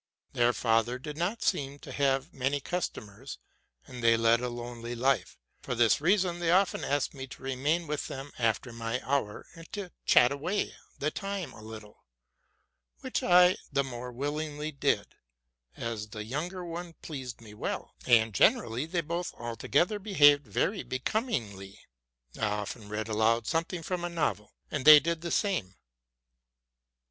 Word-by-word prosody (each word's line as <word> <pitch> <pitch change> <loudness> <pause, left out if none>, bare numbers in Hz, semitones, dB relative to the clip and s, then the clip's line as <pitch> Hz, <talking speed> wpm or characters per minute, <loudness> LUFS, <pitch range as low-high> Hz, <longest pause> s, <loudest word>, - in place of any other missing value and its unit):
Their 120 0 +3
father 115 +1 +1
did 150 +3 -7
not 180 +8 -2
seem 140 -6 0
to - - -11
have 135 +2 0
many 135 +2 0
customers, 135 - -5 0.5
and 125 -2 -9
they 115 0 +5
led 115 +1 +4
a 125 - -2
lonely 120 0 -6
life. 130 +3 +1 0.2
For 125 - -3
this 115 +1 +4
reason 180 0 +2
they 170 -1 0
often 185 +2 +3
asked 145 0 0
me 135 -1 -7
to 130 - -12
remain 140 +6 0
with 150 -1 -3
them 135 +1 -7
after 115 +1 0
my 115 +1 -2
hour, 135 -7 -1
and 165 -1 -13
to 200 -3 -5 0.2
chat 120 +1 +6
away 165 +9 -2 0.2
the 150 +2 -1
time 195 -6 -4
a 110 - -12
little, 110 -1 -11 1.0
which - - -2
I 180 0 +6
the 140 - +2
more 125 -1 -6
willingly 150 +3 -3
did, 140 - +1 0.7
as 115 -2 -4
the 105 0 -6
younger 170 - -4
one 170 0 -6
pleased 130 -6 -6
me 110 -2 -13
well; 105 - -4
and 115 -3 +5
generally 120 - +3
they 170 +1 0
both 170 +3 -4
altogether 140 - 0
behaved 145 - +5
very 185 - 0
becomingly. 115 - -3 0.6
I 110 - +1
often 105 +1 -4
read 110 +1 -3
aloud 110 +1 +2
something 165 +3 -1
from 180 +1 -3
a 175 - -1
novel, 155 -11 -2 0.2
and 145 -3 -2
they 150 +1 +11
did 165 +2 -2
the 170 - -4
same. 165 - 0
135 Hz, 155 wpm, -29 LUFS, 115-165 Hz, 1.0 s, they